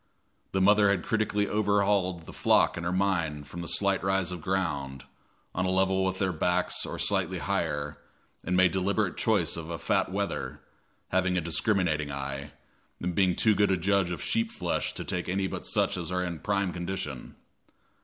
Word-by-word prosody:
The 95 - 0
mother 105 +1 +5
had 95 -3 +1
critically 105 -2 0
overhauled 100 -4 +1
the - - -10
flock - - +3
in 85 - -5
her 85 - -1
mind 85 -6 0
from 85 0 -7
a - - -6
slight 100 -2 +3
rise 95 -2 +1
of 90 -2 -6
ground, 70 -8 -2 0.5
on 95 +1 0
a - - +1
level 95 0 +2
with 95 0 0
their 95 -1 0
backs 90 +3 +1
or - - -5
slightly - - 0
higher, 75 0 -2 0.4
and 90 +2 0
made 95 -1 +5
deliberate 95 0 0
choice 100 -9 +1
of 80 -1 -6
a 85 - -3
fat - - 0
wether, 75 -8 -3 0.5
having 95 -1 +1
a - - +4
discriminating 80 -3 0
eye, 70 +1 -5 0.5
and 90 0 -2
being 95 -1 +3
too 110 - +4
good 100 0 +3
a 95 - +2
judge 95 +1 +2
of 90 - -4
sheep 230 0 0
flesh 230 - -2
to - - -4
take - - -2
any 95 +1 0
but - - -5
such - - +1
as 85 -1 -4
are 90 0 0
in 85 -3 -4
prime 100 0 0
condition. 85 -7 -5
95 Hz, 185 wpm, -28 LUFS, 85-100 Hz, 0.5 s, mother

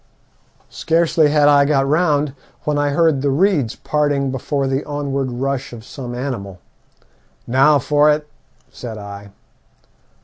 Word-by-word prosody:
Scarcely 165 -2 +2
had 145 -1 +3
I 145 -1 +6
got 140 -1 +1
round 150 -2 +1 0.3
when 150 -1 0
I 145 0 +1
heard 155 -1 +2
the 140 - +1
reeds 150 - +1
parting 145 -3 -1
before 135 +2 -2
the 135 +1 -1
onward 140 -2 -3
rush 135 +1 -3
of 115 -1 -10
some 125 -3 -7
animal. 120 -8 -5 0.9
'Now 135 +5 +4
for 145 +2 +3
it,' 150 0 -1 0.4
said 115 -3 -8
I. 100 -1 -9
140 Hz, 135 wpm, -19 LUFS, 130-150 Hz, 0.9 s, I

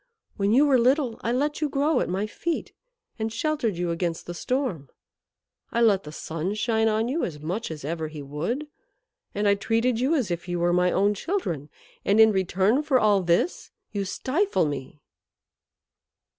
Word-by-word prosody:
When 200 0 +1
you 270 +6 +5
were 270 -3 +4
little 255 0 +2
I 235 - 0
let 290 +5 0
you 300 - +1
grow 280 0 +2
at - - -1
my 190 +3 -1
feet, 330 +10 -3 0.5
and 220 0 -1
sheltered 230 - -1
you 175 -1 -1
against 165 -1 -2
the 175 - -5
storm, 230 - -2 0.8
I 235 - 0
let 205 -6 +4
the 150 - -7
sun 165 +5 -4
shine 220 0 +1
on 220 +1 +1
you 295 +7 -1
as 150 -5 -4
much 180 +9 -3
as 150 -3 -7
ever 160 +1 -3
he 155 -2 -8
would, 165 - -3 0.7
and 205 +1 +1
I 200 - +6
treated 225 +3 +1
you 270 +6 +2
as 245 - 0
if 170 +1 -4
you 175 0 -2
were 175 0 +2
my 180 0 +3
own 205 +2 +3
children. 185 - -3 0.3
And 205 +2 +3
in 220 0 +8
return 195 +6 +2
for 285 -4 +2
all 205 -3 +4
this 175 - 0 0.2
you 200 -2 -2
stifle 285 - 0
me." 145 0 -5
210 Hz, 185 wpm, -25 LUFS, 175-255 Hz, 0.8 s, in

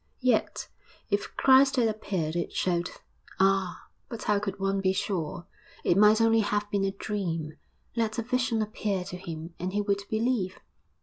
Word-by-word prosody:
Yet, 250 -4 +1 0.4
if 205 0 -1
Christ 265 +1 +6
had 240 -3 +3
appeared, 190 -7 -2
it 170 - -2
showed 175 -1 0 0.5
ah! 195 -1 +2 0.3
but 230 - -6
how 210 -1 +2
could 200 -1 -4
one 195 0 0
be 190 -1 +2
sure? 175 -3 -3 0.4
it - - +3
might 210 +2 +6
only 225 0 +4
have 205 -1 0
been 200 -1 +1
a 195 - 0
dream. 175 -6 -3 0.4
Let 225 -2 0
a 230 - -1
vision 245 -2 0
appear 205 -3 -2
to 180 - -7
him 165 -2 -7
and 185 +2 -3
he 205 - +1
would 200 0 0
believe. 220 -4 0
200 Hz, 170 wpm, -28 LUFS, 185-220 Hz, 0.5 s, Christ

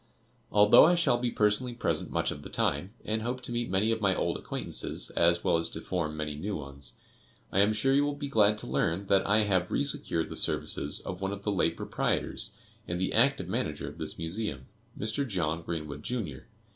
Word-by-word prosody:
Although 105 +7 +7
I 175 - +4
shall 145 -8 +2
be 120 0 0
personally 115 +3 +1
present 120 - -1
much - - 0
of - - -7
the - - -9
time, 90 +8 0
and 110 +1 -1
hope 125 +3 -3
to 125 - -6
meet 120 0 -2
many 95 +4 +1
of 110 -1 -1
my 95 -3 +2
old - - -1
acquaintances, - - -4
as 85 +1 +2
well - - +3
as 80 0 0
to - - -4
form 80 -3 -3
many 75 -1 -3
new 100 +7 -4
ones, 70 -3 -3 0.6
I 95 - +1
am 100 +2 +4
sure 120 +6 +2
you 140 +1 +4
will 145 0 -1
be 145 0 -5
glad 105 -5 +3
to - - -8
learn 85 +4 0
that 100 -1 +3
I 105 +2 +4
have 95 -3 +1
re 145 - 0
secured 140 - +1
the - - -6
services 75 - +3
of 90 0 -6
one 95 0 -1
of 100 0 -6
the 105 - 0
late 95 - 0
proprietors, 110 - -1 0.4
and 90 0 -3
the 95 - -1
active 135 +5 +3
manager - - -3
of - - -9
this - - -3
Museum, 80 -5 -4 0.3
Mr. 110 +7 -1
John 85 -6 -1
Greenwood, 75 -3 -5
Jr. 105 - -4
100 Hz, 215 wpm, -29 LUFS, 85-115 Hz, 0.6 s, Although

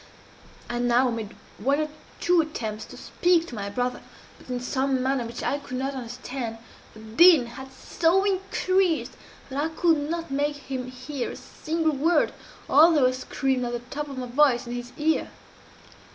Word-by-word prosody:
"I 240 - -3
now 245 +1 +3
made 225 -2 -5 0.2
one 280 +3 +1
or 310 - 0 0.3
two 350 -1 +4
attempts 220 -9 -5
to - - -12
speak 350 -2 +2
to 305 - -11
my 200 -3 -4
brother 250 +4 -2 0.4
but, - - -17
in 250 -1 -2
some 260 +1 0
manner 260 -3 0
which 235 +1 -7
I 285 - 0
could 255 -2 -6
not 270 +2 -2
understand, 245 -1 -5 0.4
the 220 - -12
din 260 +6 +6
had 265 +3 -10
so 335 +7 +1
increased 380 -3 +1 0.4
that 275 +2 -1
I - - +1
could 325 -1 +2
not 335 -3 -3
make 290 +2 0
him 260 -3 -5
hear 255 +1 -5
a - - -7
single 320 0 -2
word, 315 +3 +2 0.3
although 310 -2 +6
I 255 - +4
screamed 260 0 -1
at 240 0 -3
the 240 +2 -6
top 295 0 -3
of 275 - -7
my 255 - -3
voice 250 -1 +3
in 240 - -6
his 245 0 -6
ear. 315 +1 +1
270 Hz, 180 wpm, -26 LUFS, 245-315 Hz, 0.4 s, din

